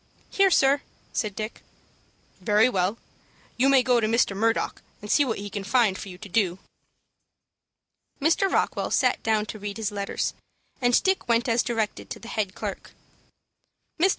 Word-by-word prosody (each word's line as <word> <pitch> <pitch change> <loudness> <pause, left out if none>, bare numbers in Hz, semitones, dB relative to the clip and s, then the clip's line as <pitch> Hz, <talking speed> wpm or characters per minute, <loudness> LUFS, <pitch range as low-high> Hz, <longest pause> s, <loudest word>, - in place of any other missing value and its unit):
"Here, 390 -1 +4
sir," 280 -4 +4 0.3
said 210 -3 -2
Dick. 215 +2 -5 0.8
"Very 210 +4 +4
well, 195 -2 0 0.6
you 260 +3 +3
may 270 -2 +5
go 245 -2 +3
to 220 - +1
Mr. 225 -3 +2
Murdock, 225 +3 0 0.2
and 210 - -6
see 290 - +5
what 235 -5 -2
he 205 - -6
can 200 0 -5
find 215 -1 +2
for 195 - -7
you 180 - -10
to 210 - -10
do." 185 -2 +1 1.6
Mr. 335 +6 +2
Rockwell - - 0
sat - - +2
down 215 -1 +1
to 215 - -8
read 205 0 -5
his 220 -2 -2
letters, 200 -1 -2 0.5
and 245 -1 +3
Dick 380 -6 +1
went 235 +1 +2
as 230 0 +3
directed 225 -3 -2
to - - -6
the 230 - -10
head 205 -4 -2
clerk. - - -6 1.1
"Mr. 370 +4 +5
225 Hz, 170 wpm, -25 LUFS, 205-250 Hz, 1.6 s, may